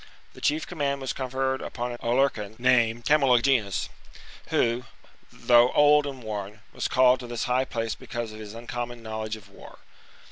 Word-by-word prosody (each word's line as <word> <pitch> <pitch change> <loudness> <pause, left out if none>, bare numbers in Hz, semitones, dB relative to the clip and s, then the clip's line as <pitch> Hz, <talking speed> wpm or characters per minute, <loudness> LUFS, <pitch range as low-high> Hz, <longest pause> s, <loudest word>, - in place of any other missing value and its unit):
The - - -14
chief 155 +2 +1
command 140 -5 -2
was 135 -1 -3
con 130 -1 -4
ferred 130 +1 -1
upon 120 0 -4
an 120 - -7
Aulercan, 115 -4 0
named 120 -2 +2
Camulogenus, 125 -7 +3 0.6
who, 120 +2 +1 0.5
though 120 0 +4
old 145 0 +5
and 135 -3 -7
worn, 105 -1 -6
was - - -2
called 130 -1 +4
to 125 - -8
this 120 -1 -3
high 125 +1 +1
place 115 -3 -3
because 120 -2 -6
of 110 - -10
his 105 0 -9
uncommon 120 0 -6
knowledge 110 0 -4
of 105 -3 -14
war. 100 - -14
120 Hz, 170 wpm, -26 LUFS, 110-130 Hz, 0.6 s, old